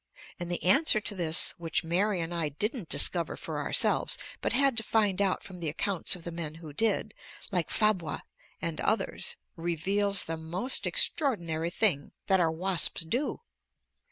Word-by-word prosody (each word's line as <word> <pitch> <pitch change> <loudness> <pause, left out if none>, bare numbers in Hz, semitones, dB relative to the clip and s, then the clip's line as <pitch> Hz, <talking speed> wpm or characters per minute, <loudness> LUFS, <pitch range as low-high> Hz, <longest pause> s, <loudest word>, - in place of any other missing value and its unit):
And 175 0 -5
the 175 - -3
answer 215 - +5
to 210 - 0
this, 170 -4 +2
which 165 0 0
Mary 180 +3 +1
and 165 +1 -4
I 165 -3 -1
didn't 205 - -4
discover 170 -2 +3
for - - -5
ourselves, - - +1 0.2
but - - -1
had 270 0 +4
to - - +1
find 205 -3 +1
out 195 -2 0
from 185 -2 -10
the 165 -3 -2
accounts 185 +5 0
of 175 - -12
the 170 - -6
men 165 -2 -5
who 160 -3 -10
did, 225 +8 0 0.4
like 175 -5 0
Fabre 190 -8 +1 0.4
and - - -3
others, - - -1 0.2
reveals 190 +4 +1
the 165 0 -5
most 175 +11 0
extraordinary 170 - 0
thing 175 -6 +1
that 190 -1 +3
our 165 -2 +3
wasps 180 +2 +1
do. 240 - -2
175 Hz, 165 wpm, -29 LUFS, 165-205 Hz, 0.4 s, answer